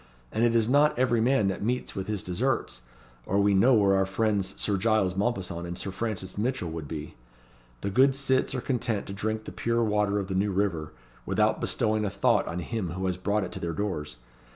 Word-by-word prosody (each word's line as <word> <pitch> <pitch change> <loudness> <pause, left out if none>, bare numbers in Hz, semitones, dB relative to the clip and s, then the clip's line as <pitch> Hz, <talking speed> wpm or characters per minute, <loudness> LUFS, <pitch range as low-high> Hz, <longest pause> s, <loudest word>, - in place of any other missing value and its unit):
And 110 - 0
it 120 -1 +3
is 115 -1 +3
not 145 +3 +4
every 120 -2 +2
man 125 -3 +3
that 95 - -3
meets 125 +4 -2
with 95 -1 -4
his 105 -2 -3
desserts, 110 - -1 0.5
or 100 - +1
we 100 0 +4
know 120 +7 +5
where 100 -3 +4
our 95 0 +2
friends 100 -1 0
Sir 105 - +1
Giles 100 -2 +2
Mompesson 95 -5 -2
and 85 0 -5
Sir 100 - -4
Francis 95 -1 -4
Mitchell 120 -7 -1
would 80 -2 -6
be. 75 0 -6 0.7
The 100 - -2
good 135 +6 +4
cits 135 -1 +1
are 130 - -2
content 120 -5 -1
to 100 - -6
drink 110 +2 -2
the - - -8
pure 115 0 0
water 105 -2 +1
of 100 - -1
the 95 - -3
New 100 +2 +1
River, 90 -6 -1 0.3
without - - +1
bestowing 110 0 +1
a 105 - 0
thought - - +2
on 85 +2 -3
him 95 -4 -3
who 95 +1 -3
has 90 -1 0
brought 100 +3 0
it - - -5
to - - -5
their 85 -1 -3
doors. 75 -8 -3
100 Hz, 220 wpm, -27 LUFS, 95-115 Hz, 0.7 s, know